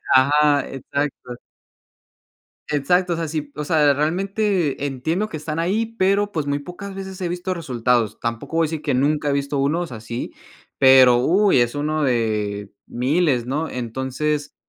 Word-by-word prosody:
Ajá, 145 +2 +4
exacto. 135 -2 -4 1.3
Exacto, 175 +5 +1
o - - -1
sea, 165 -1 -2
sí, 150 -2 -4
o 150 - -4
sea, 150 -3 +4
realmente 180 0 0
entiendo 160 +10 -2
que 160 - -6
están 155 +1 -4
ahí, 200 +7 +1
pero, 200 +2 +2
pues, 155 -6 -2
muy 145 0 -1
pocas 190 +6 -8
veces 190 -1 -7
he 180 - -2
visto 180 +2 -3
resultados. 125 - 0
Tampoco 115 +7 -4
voy 165 - +3
a - - -2
decir 160 -2 -4
que 150 -2 -1
nunca 145 +3 +1
he - - +1
visto 140 0 -1
unos 150 +4 0
así, 115 +1 -6 0.4
pero, 130 -2 +7
uy, 180 +5 +3
es 120 +1 +1
uno 150 +1 -1
de 105 -5 -1 0.2
miles, 130 0 +1
¿no? 150 +6 -2
Entonces, 130 +5 -3
145 Hz, 160 wpm, -21 LUFS, 130-170 Hz, 1.3 s, pero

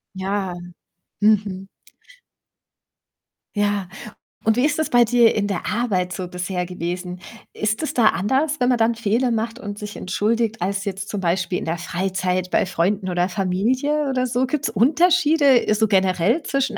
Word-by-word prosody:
Ja, 190 -1 -2 0.7
mhm. 205 -2 +1 1.9
Ja, 205 -2 0 0.6
und 220 +1 +2
wie 250 - +3
ist 300 0 +1
das 315 - -1
bei 240 -1 +5
dir 235 0 +4
in 205 -1 0
der 195 -3 -3
Arbeit 195 -6 -1
so 185 -1 -5
bisher 180 0 -3
gewesen? 180 0 -5 0.3
Ist 215 +1 -2
es 310 - -3
da 225 -3 +5
anders, 275 - 0
wenn 250 0 +2
man 250 - +3
dann 230 0 +2
Fehler 230 +2 0
macht 225 +1 -2
und 205 -4 -7
sich 210 0 -7
entschuldigt, 220 +4 -1
als 195 +2 -2
jetzt 200 +1 -4
zum 205 - -3
Beispiel 180 0 0
in - - -5
der 165 +1 -2
Freizeit 185 +1 -2
bei - - +2
Freunden 190 +2 0
oder 175 0 +1
Familie 240 +12 0
oder 255 -1 0
so? 250 +2 0
Gibt's 260 -2 -2
Unterschiede, 295 - +4
äh, - - +3
so 220 +1 +2
generell 190 - +2
zwischen 270 -6 -1
210 Hz, 165 wpm, -21 LUFS, 185-245 Hz, 1.9 s, bei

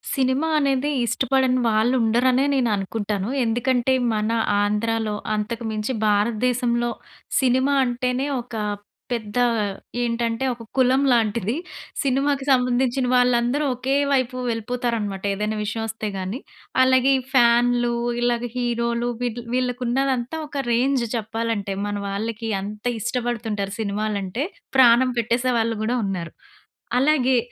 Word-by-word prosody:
Cinema 265 +3 +1
అనేది 275 0 +1 0.2
ఇష్టపడని 255 +2 +1
వాళ్ళు 220 +3 +2
ఉండరనే 250 +4 +3
నేననుకుంటాను. 210 -4 -1 0.2
ఎందుకంటే, 245 +2 +1 0.2
మన 215 +1 0 0.3
ఆంధ్రాలో 215 +1 0 0.2
అంతకుమించి 220 +1 -3
భారతదేశంలో 235 +3 +1 0.5
సినిమా 260 +2 +2
అంటేనే 250 +2 -1
ఒక 240 -1 -10 0.6
పెద్ద 220 -2 -3 0.6
ఏంటంటే 235 +1 -1
ఒక 230 - -11
కులం 260 +2 +4
లాంటిది. 225 -2 +1 0.5
సినిమాకి 275 0 0
సంబంధించిన 250 0 +2
వాళ్ళందరూ 245 +3 +3
ఒకే 260 +3 -1 0.2
వైపు 255 -1 +1
వెళ్ళిపోతారనమాట. 225 -3 -2
ఏదైనా 210 +2 -2
విషయం 215 +2 -3
వస్తే 220 -1 -4
గాని. 190 +6 -4 0.4
అలాగే 260 +1 +4 0.2
ఫ్యానులు, 240 -1 +4 0.3
ఇలాగ 240 0 0
హీరోలు 235 -1 0
వీటి 240 -1 -3
వీళ్ళకున్నదంతా 255 +2 0
ఒక 285 -1 -3
రేంజ్ 255 +2 +2
చెప్పాలంటే. 220 -2 -2
మన 205 0 -3
వాళ్ళకి 220 +3 -3
అంత 210 +3 -8
ఇష్టపడుతుంటారు 225 -4 -2
సినిమాలంటే. 210 +2 -2 0.3
ప్రాణం 255 0 +6
పెట్టేసే 240 +2 +1
వాళ్ళు 225 0 0
కూడా 240 +3 0
ఉన్నారు. 180 -4 -4 0.7
అలాగే 265 -2 +3
240 Hz, 105 wpm, -23 LUFS, 220-255 Hz, 0.7 s, ప్రాణం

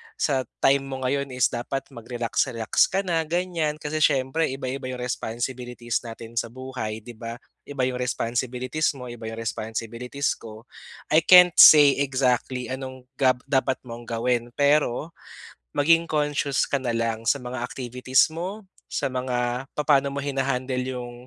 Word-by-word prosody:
sa 135 -3 0 0.2
time 140 +1 +5
mo 135 -1 -6
ngayon 140 +2 0
is 125 - +2
dapat 135 +3 -3
magrelax-relax 120 -1 0
ka 195 +1 -1
na, 170 -3 0
ganyan. 170 -3 -1
Kasi 155 +1 -4
siyempre 145 +2 +2
iba-iba 130 0 -4
yung 125 -1 -5
responsibilities 120 0 -3
natin 115 0 -5
sa - - -3
buhay, 115 -3 -6
'di 120 - -9
ba, 115 0 -5 0.3
Iba 140 -2 -4
'yong 125 0 0
responsibilities 125 +4 -1
mo, 125 -2 -8
iba 115 -1 -9
yung 110 - -5
responsibilities 115 +4 -3
ko 110 0 -11 0.5
I 155 - +7
can't 180 +2 +8
say 145 -3 +9
exactly 130 -2 0
anong 130 -1 -6 0.2
ga 130 -2 +4
dapat 135 -1 +1
mong 120 -1 -9
gawin, 120 +1 -1
pero 145 +1 +2 0.6
maging 165 +3 +4
conscious 145 -3 0
ka 140 - +1
nalang 115 -2 -2
sa - - +4
mga 125 0 -5
activities 125 +2 +1
mo, 185 +6 -5 0.2
sa - - -2
mga 125 0 -2
papaano 145 -2 +3
mo 140 0 -3
hina-handle 130 -2 -1
yung 125 -2 -5
130 Hz, 145 wpm, -25 LUFS, 120-140 Hz, 0.6 s, say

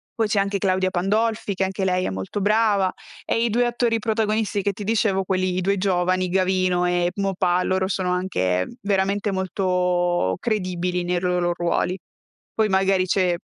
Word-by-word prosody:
poi 225 -1 +1
c'è 210 -1 +1
anche 200 0 -1
Claudia 185 -1 +1
Pandolfi, 210 +3 0
che 190 - 0
anche 190 0 -3
lei 185 -1 +1
è - - -1
molto 95 - -4
brava, 205 -2 +2 0.3
e 230 - 0
i - - +1
2 240 +3 +2
attori 235 -1 0
protagonisti 220 -1 0
che 200 0 0
ti 205 - -7
dicevo, 205 -3 +1
quelli, 185 -1 -1
i - - 0
2 200 +2 +1
giovani, 185 -1 +1
Gavino 185 -1 +1
e 175 0 +1
Maupas, 185 -2 0
loro 190 0 0
sono 185 -2 -1
anche 95 - 0
veramente 200 +1 0
molto 180 - 0
credibili 180 -4 -1
nei 175 0 0
loro 180 -1 0
ruoli. 175 +1 -1 0.6
Poi 220 -1 +1
magari 190 -1 +2
c'è 185 -1 +1
190 Hz, 170 wpm, -23 LUFS, 180-205 Hz, 0.6 s, brava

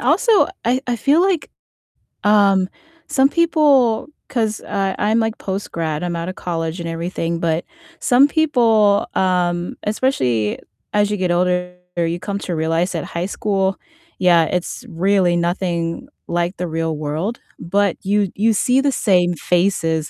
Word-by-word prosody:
also 395 - +3 0.2
I 250 +2 +1
I 245 -1 -1
feel 285 +9 +3
like, 375 -4 0 0.7
um, 200 -3 +4 0.4
some 270 0 +3
people 290 -9 +3 0.2
'cause, 220 -4 -1
uh, 195 -1 -2
I'm, 215 +2 +2
like, 225 -1 -1
post-grad, 165 -5 -3
I'm 175 -1 -2
out 170 +1 -3
of 185 - -6
college 165 0 -3
and 170 -1 -4
everything, 165 0 -3
but 165 0 0 0.4
some 260 +2 +5
people, 230 -10 +3
um, 175 -2 0
especially 130 - 0 0.4
as 205 0 +2
you 210 - -1
get 185 -2 -1
older, 180 0 0 0.2
you 170 0 -1
come 200 +2 -4
to 180 -3 -4
realize 165 +3 0
that 165 - -3
high 170 +2 -3
school 195 -1 -1 0.4
yeah, 175 -3 +4
it's 180 +9 -3
really 185 -1 +2
nothing 170 +4 -2 0.2
like 175 +2 -1
the 180 - -3
real 160 0 -2
world, 155 +9 -3 0.2
but 200 +2 0
you 200 0 +1
you 220 +3 +2
see 250 +5 +2
the 280 0 +2
same 180 -8 +2
faces, 165 -2 0
190 Hz, 150 wpm, -19 LUFS, 170-220 Hz, 0.7 s, some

